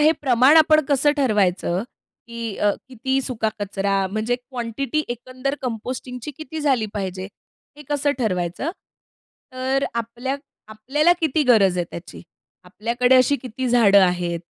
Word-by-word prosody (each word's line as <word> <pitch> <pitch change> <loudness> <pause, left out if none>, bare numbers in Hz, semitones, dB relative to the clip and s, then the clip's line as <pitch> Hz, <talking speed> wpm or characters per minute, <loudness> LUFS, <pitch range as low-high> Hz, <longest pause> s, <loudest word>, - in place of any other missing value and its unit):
हे 310 +2 +5
प्रमाण 260 +3 +5
आपण 310 -1 +5
कसं 290 +1 +3
ठरवायचं? 200 -8 +1 0.5
की 230 -3 -5
अ, 205 - +3 0.2
किती 265 +2 -1
सुका 225 -4 -1
कचरा? 195 -1 -1
म्हणजे 215 +4 -1
क्वांटिटी 250 +3 -3
एकंदर 255 +3 -4
कंपोस्टिंगची 250 +2 -5
किती 315 0 -7
झाली 265 -7 +1
पाहिजे? 190 -2 -4 0.5
हे 295 - -11
कसं 290 0 +1
ठरवायचं? 185 - -1 0.8
तर 260 +2 0
आपल्या 235 +4 -3 0.3
आपल्याला 270 +10 +2
किती 310 -1 +1
गरज 210 -8 +4
आहे 175 - 0
त्याची? 175 +1 -9 0.4
आपल्याकडे 235 +7 +1
अशी 255 +3 +4
किती 255 +1 -4
झाडं 220 -5 +5
आहेत? 175 -2 -1
245 Hz, 130 wpm, -22 LUFS, 210-270 Hz, 0.8 s, हे